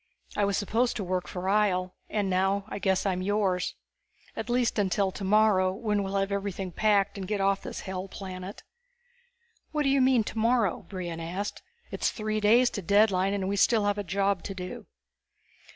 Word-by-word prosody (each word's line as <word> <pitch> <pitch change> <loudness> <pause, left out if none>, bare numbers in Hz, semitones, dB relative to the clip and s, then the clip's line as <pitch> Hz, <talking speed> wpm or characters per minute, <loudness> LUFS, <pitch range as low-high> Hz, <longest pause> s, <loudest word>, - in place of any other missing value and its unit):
I 205 - +2
was 200 0 0
supposed 230 +5 0
to 215 - -3
work 185 0 -2
for 180 - -6
Ihjel, 190 -3 +2 0.2
and 205 -2 0
now 195 +2 +1
I - - -5
guess 190 -1 +1
I'm 185 -2 0
yours. 195 -2 0 0.6
At 220 - -5
least 240 -2 +1
until 195 0 +1
tomorrow, 195 -1 +3
when 210 0 -1
we'll 195 0 -3
have 195 0 0
everything 195 -2 -3
packed 200 +1 +2
and 190 - -5
get 210 0 -1
off 195 0 +2
this - - -6
hell 190 0 -5
planet." 185 0 -8 1.1
"What 305 -1 0
do 275 - +2
you 275 0 +3
mean, 255 -3 +4
tomorrow?" 225 -4 0
Brion 175 -4 -5
asked. 180 +5 -4 0.3
"It's - - 0
three 215 -1 -2
days 235 +4 +4
to 200 - -4
deadline 200 0 +3
and 190 -2 -2
we 200 - 0
still 220 0 +3
have 205 0 +1
a - - -2
job 195 +1 0
to 195 - -5
do." 180 -1 -7
200 Hz, 185 wpm, -28 LUFS, 190-215 Hz, 1.1 s, mean